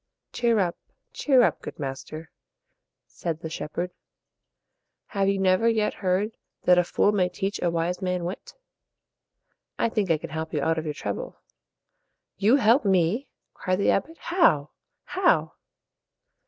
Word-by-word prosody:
"Cheer 235 -2 +2
up, 180 -4 0 0.4
cheer 265 -4 +4
up, - - +1
good - - -8
master," 145 +3 -6 0.7
said 165 -2 -5
the 160 - -6
shepherd. 175 +3 -4 1.2
"Have 195 -1 +1
you 200 - +1
never 190 +4 +3
yet 220 -2 +1
heard 195 +2 0 0.3
that 180 0 +5
a - - +4
fool 205 - +2
may 185 -3 +1
teach 195 +3 -3
a 175 - +2
wise 170 +2 -1
man 180 -1 -1
wit? 180 +3 -7 1.2
I - - +1
think 210 -4 -1
I 165 - +4
can 155 0 -8
help 160 +1 -4
you 145 - 0
out 160 0 +1
of 160 - -6
your 150 -1 -3
trouble." - - -5 1.0
"You 215 +6 +4
help 235 0 +4
me!" 190 +5 +2 0.3
cried 185 -1 -1
the 200 - +3
abbot 320 +11 -1
"How? 240 - +2 0.3
how?" - - +2
185 Hz, 150 wpm, -26 LUFS, 165-210 Hz, 1.2 s, that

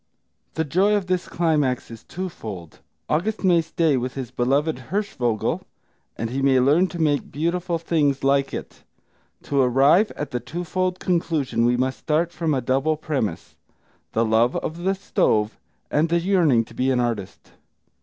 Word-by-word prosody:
The 160 - +1
joy 190 +8 +2
of 205 -2 0
this 185 -1 -1
climax 150 -8 0
is 115 - -10
twofold: 110 - -7 0.3
August 205 +9 -1
may 175 -3 +4
stay 165 -3 +1
with 125 +1 -3
his 130 -4 -5
beloved 135 +2 0
Hirschvogel, 150 - -1 0.6
and 115 +1 -3
he 135 +2 -2
may 135 -1 +4
learn 150 +8 +4
to 180 - -8
make 150 -3 0
beautiful 170 +3 -1
things 150 -5 0
like 140 0 +2
it. - - -8 0.6
To 140 -1 +1
arrive 135 - +4
at 150 - -5
the 125 - -1
twofold 180 +7 -3
conclusion 165 -9 0
we 120 0 +2
must 130 +1 -1
start 165 +2 0
from 165 -4 -1
a 130 - 0
double 135 +6 +1
premise, 135 - -3 0.6
the 115 +1 +2
love 115 +3 +2
of 160 - -3
the 190 +2 0
stove 115 - 0 0.3
and 155 +3 +2
the 170 +1 +2
yearning 165 - +3
to - - -16
be 130 +1 0
an 130 -2 +2
artist. 115 -6 -3
150 Hz, 165 wpm, -23 LUFS, 125-170 Hz, 0.6 s, may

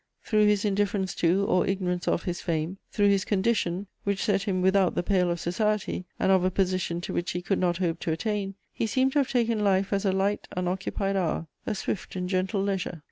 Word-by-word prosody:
Through 215 -2 +3
his 210 0 +2
indifference 200 -2 0
to, 180 +4 +2
or 185 - +2
ignorance 180 -2 -1
of, - - +1
his 175 -1 -3
fame, 165 +3 -2
through 205 -1 +3
his 195 -1 +3
condition, 200 -3 0 0.2
which 200 -1 -1
set 205 -4 +2
him 185 -2 -1
without 190 -1 +3
the - - 0
pale 180 -2 +2
of 170 0 -1
society 200 +1 -1
and 190 - +3
of 190 -2 +4
a 185 - +3
position 185 -2 0
to - - -5
which 175 - -1
he 180 - -2
could 195 +2 0
not 175 -2 +1
hope 170 -2 -1
to 165 - -2
attain, 195 +3 -2 0.2
he 225 - -1
seemed 260 +4 +2
to 290 - +2
have 275 - +1
taken 230 -4 +1
life 195 0 +2
as 195 - +1
a 195 - +2
light, 195 +2 0
unoccupied 190 +2 -1
hour, 165 -3 -1 0.2
a 215 - 0
swift 195 0 -4
and 180 -1 -3
gentle 190 +2 0
leisure. 190 -4 -2
190 Hz, 220 wpm, -27 LUFS, 180-205 Hz, 0.2 s, of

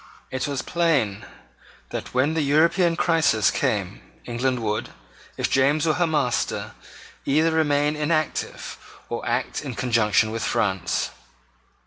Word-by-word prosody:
It 130 +1 -2
was 140 -2 -3
plain 150 - 0 0.6
that, - - -5
when 130 +5 +2
the 160 - +1
European 165 +4 +3
crisis 160 - +3
came, - - -1 0.2
England 125 +1 -1
would, 105 0 -2 0.5
if - - 0
James 145 +3 +2
were 155 - +3
her 175 +1 +1
master, 145 -6 -1 0.5
either 155 +4 +2
remain 150 -2 +2
inactive 155 0 -2 0.3
or - - -4
act - - -1
in - - -5
conjunction 110 -3 +2
with 115 0 -3
France. 95 -4 0
145 Hz, 125 wpm, -24 LUFS, 120-160 Hz, 0.6 s, European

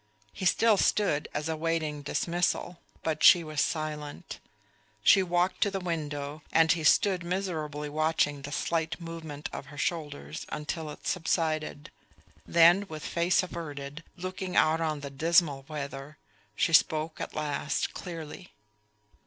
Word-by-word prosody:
He 190 - -5
still 220 +3 +4
stood 185 -8 +2
as 150 - -3
awaiting 160 -2 -1
dismissal; 170 +3 -1 0.2
but 155 -1 -1
she 175 -2 +8
was 155 -2 -2
silent. 150 -2 -3 0.6
She 195 - +7
walked 180 0 0
to 205 - +4
the 195 -1 -3
window, 150 -4 -4
and 160 0 +5
he 165 -2 0
stood 185 +3 +4
miserably 160 -5 -3
watching 150 -1 +1
the 140 +1 -7
slight 160 +2 -1
movement 165 -3 -6
of 140 - -6
her 145 - -12
shoulders 145 -1 -3
until 155 +1 -4
it 150 - -10
subsided. 155 -3 -1 0.6
Then 170 +4 +5
with 155 -1 -7
face 170 +2 +2
averted, 150 -3 -6
looking 185 0 -5
out 160 +1 +4
on 155 -3 -1
the 140 -1 -6
dismal 150 -1 +2
weather, 145 -1 -6 0.4
she 165 - +1
spoke 155 0 +3
at - - -5
last 150 -1 -1
clearly. 170 0 -8
160 Hz, 135 wpm, -29 LUFS, 150-170 Hz, 0.6 s, she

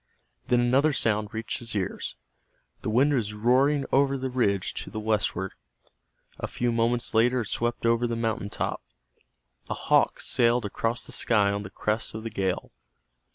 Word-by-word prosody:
Then 125 -1 +3
another 135 +5 +3
sound 105 -4 +1
reached 110 +1 -4
his 115 -2 -6
ears. 95 -3 -3 0.7
The - - -3
wind 135 +7 +3
was 105 -5 -1
roaring 130 +6 +3
over 140 0 +3
the 130 0 -3
ridge 100 -7 0
to - - -10
the 110 - -5
westward. 105 -3 -1 0.9
A - - -3
few 120 0 -1
moments 115 +1 +1
later 120 +3 +3
it 110 - -5
swept 120 0 -1
over 115 +1 +3
the 115 - -2
mountain 110 -3 -2
top. - - -3 0.9
A - - -1
hawk - - +2
sailed 120 -1 +2
across 115 +4 -2
the - - -11
sky 105 -4 +2
on 100 0 -2
the 100 - -7
crest 105 +2 -2
of 110 - -5
the 115 - -5
gale. 95 -3 -2
115 Hz, 170 wpm, -27 LUFS, 105-125 Hz, 0.9 s, Then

